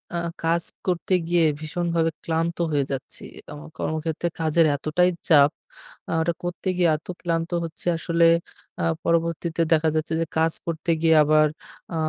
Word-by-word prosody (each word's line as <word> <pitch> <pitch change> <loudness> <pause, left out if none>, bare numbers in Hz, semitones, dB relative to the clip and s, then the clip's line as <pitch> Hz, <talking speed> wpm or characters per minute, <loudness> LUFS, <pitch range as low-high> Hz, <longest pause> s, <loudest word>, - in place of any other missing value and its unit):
আ - - 0 0.3
কাজ 170 +1 +1 0.2
করতে 180 +1 0
গিয়ে 170 -1 +3 0.2
ভীষণভাবে 165 0 -1
ক্লান্ত 165 +1 -1
হয়ে 145 -2 +2
যাচ্ছি। 135 0 -6 0.3
আমার 150 +2 -10
কর্মক্ষেত্রে 160 +1 -2
কাজের 160 +1 +3
এতটাই 160 +5 +1 0.2
চাপ 145 -1 +6 0.6
আ - - -3
ওটা 170 +1 0
করতে 175 +2 -5
গিয়ে 175 -2 +3
এত 160 - -21
ক্লান্ত 165 -1 -1
হচ্ছি 165 0 -7
আসলে 170 0 +2 0.6
আ - - -1 0.2
পরবর্তীতে 170 0 0
দেখা 160 0 +3
যাচ্ছে 155 +1 -1
যে - - +1
কাজ 160 0 +2
করতে 165 0 -2
গিয়ে 160 -1 +4
আবার 155 0 +4 0.5
আ - - -2
165 Hz, 155 wpm, -24 LUFS, 155-170 Hz, 0.6 s, চাপ